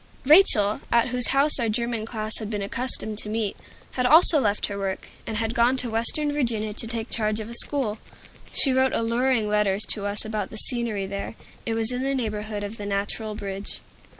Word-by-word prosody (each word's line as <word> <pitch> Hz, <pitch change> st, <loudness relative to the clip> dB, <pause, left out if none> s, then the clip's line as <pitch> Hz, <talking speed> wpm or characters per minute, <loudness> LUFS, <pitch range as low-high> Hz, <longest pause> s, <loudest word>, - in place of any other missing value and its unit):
Rachel, 255 Hz, -, +5 dB
at 235 Hz, +1 st, +3 dB
whose 250 Hz, 0 st, +5 dB
house 280 Hz, +2 st, +2 dB
our 230 Hz, -2 st, 0 dB
German 230 Hz, 0 st, -2 dB
class 215 Hz, -1 st, -4 dB
had 215 Hz, -2 st, -6 dB
been 205 Hz, -2 st, -3 dB
accustomed 220 Hz, -1 st, 0 dB
to 210 Hz, -, -5 dB
meet, 215 Hz, -2 st, -2 dB, 0.4 s
had 250 Hz, -1 st, 0 dB
also 315 Hz, +2 st, +6 dB
left 210 Hz, -5 st, 0 dB
her 200 Hz, -, -5 dB
work, 195 Hz, -1 st, -4 dB, 0.2 s
and 220 Hz, -, -3 dB
had 225 Hz, 0 st, -2 dB
gone 240 Hz, +2 st, +2 dB
to 250 Hz, -2 st, -1 dB
western 265 Hz, +7 st, +1 dB
Virginia 230 Hz, -7 st, -2 dB
to 225 Hz, -, -3 dB
take 225 Hz, 0 st, -5 dB
charge 215 Hz, -1 st, 0 dB
of 220 Hz, +1 st, -7 dB
a -, -, -7 dB
school. 235 Hz, -3 st, +2 dB, 0.5 s
She 270 Hz, -, +3 dB
wrote 260 Hz, 0 st, +2 dB
alluring 230 Hz, 0 st, 0 dB
letters 210 Hz, -1 st, +1 dB
to 205 Hz, -2 st, +2 dB
us 205 Hz, +1 st, -2 dB
about 215 Hz, -2 st, -3 dB
the 220 Hz, -, -9 dB
scenery 230 Hz, -5 st, +1 dB
there; 200 Hz, +3 st, -6 dB, 0.3 s
it 225 Hz, -, -1 dB
was 225 Hz, +1 st, +1 dB
in 250 Hz, 0 st, -3 dB
the 275 Hz, +1 st, -1 dB
neighborhood 215 Hz, -3 st, -4 dB
of 205 Hz, +2 st, -6 dB
the 205 Hz, -, -7 dB
Natural 205 Hz, +2 st, -3 dB
Bridge. 200 Hz, -1 st, -7 dB
225 Hz, 205 wpm, -24 LUFS, 210-245 Hz, 0.5 s, also